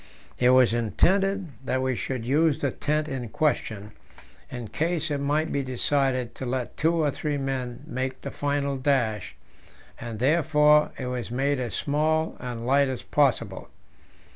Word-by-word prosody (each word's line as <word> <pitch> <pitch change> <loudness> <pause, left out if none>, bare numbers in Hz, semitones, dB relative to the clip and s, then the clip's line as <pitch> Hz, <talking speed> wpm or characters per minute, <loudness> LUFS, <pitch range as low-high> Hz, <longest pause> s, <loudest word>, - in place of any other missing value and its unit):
It 125 - +4
was 130 -2 +5
intended 190 - +1
that 130 -1 -1
we 130 -1 0
should 125 -1 -4
use 150 +3 +3
the 140 - -1
tent 150 +3 -1
in 125 -5 -4
question, 110 -7 -1 0.6
in 120 -3 -6
case 160 +2 -1
it 145 - 0
might 150 +3 0
be 140 - 0
decided 130 -1 0
to 130 - -6
let 125 -1 -3
two 165 +2 +2
or 155 -3 +2
three 150 +1 -2
men 130 -3 -3
make 130 +1 -4
the - - -6
final 140 -1 -1
dash, 125 -6 0 0.6
and 115 -2 -6
therefore 150 +2 +4
it 130 - -4
was 125 -2 -4
made 135 +3 0
as 120 -4 -3
small 155 +2 0
and 120 -2 -5
light 140 +2 +4
as 130 -2 -4
possible. 120 -9 0
135 Hz, 160 wpm, -26 LUFS, 125-150 Hz, 0.6 s, was